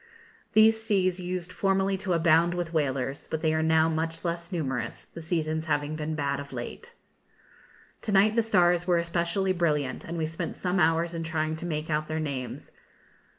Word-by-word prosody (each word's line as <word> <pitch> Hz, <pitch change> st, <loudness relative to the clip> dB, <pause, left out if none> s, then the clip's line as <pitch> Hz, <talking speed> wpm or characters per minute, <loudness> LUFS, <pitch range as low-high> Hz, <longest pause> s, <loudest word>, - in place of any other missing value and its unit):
These 220 Hz, +1 st, +6 dB
seas 190 Hz, -4 st, +1 dB
used 180 Hz, 0 st, -4 dB
formerly 195 Hz, 0 st, +1 dB
to 190 Hz, -1 st, -1 dB
abound 170 Hz, +1 st, +4 dB
with 175 Hz, -1 st, -3 dB
whalers, 135 Hz, -3 st, -1 dB
but 160 Hz, -, -3 dB
they 155 Hz, -1 st, +2 dB
are 160 Hz, -, +1 dB
now 160 Hz, 0 st, +4 dB
much 165 Hz, +1 st, -2 dB
less 170 Hz, +1 st, -3 dB
numerous, 135 Hz, -9 st, -3 dB
the 165 Hz, -, -10 dB
seasons 160 Hz, -1 st, -1 dB
having 145 Hz, 0 st, 0 dB
been 155 Hz, 0 st, -3 dB
bad 140 Hz, -2 st, -1 dB
of 140 Hz, 0 st, -8 dB
late. 475 Hz, +1 st, -7 dB, 1.1 s
To 215 Hz, -, -3 dB
night 205 Hz, +2 st, +4 dB
the 230 Hz, -, +4 dB
stars 175 Hz, -5 st, +3 dB
were 175 Hz, -1 st, +4 dB
especially 170 Hz, +3 st, 0 dB
brilliant, 150 Hz, -6 st, 0 dB
and 170 Hz, +1 st, -5 dB
we 160 Hz, -, 0 dB
spent 160 Hz, +1 st, -4 dB
some 180 Hz, 0 st, -1 dB
hours 165 Hz, +1 st, +2 dB
in 165 Hz, -, -3 dB
trying 160 Hz, -1 st, -1 dB
to 175 Hz, -, -5 dB
make 155 Hz, -1 st, -3 dB
out 155 Hz, 0 st, 0 dB
their 155 Hz, 0 st, -2 dB
names. 135 Hz, -5 st, -5 dB
165 Hz, 185 wpm, -27 LUFS, 155-180 Hz, 1.1 s, These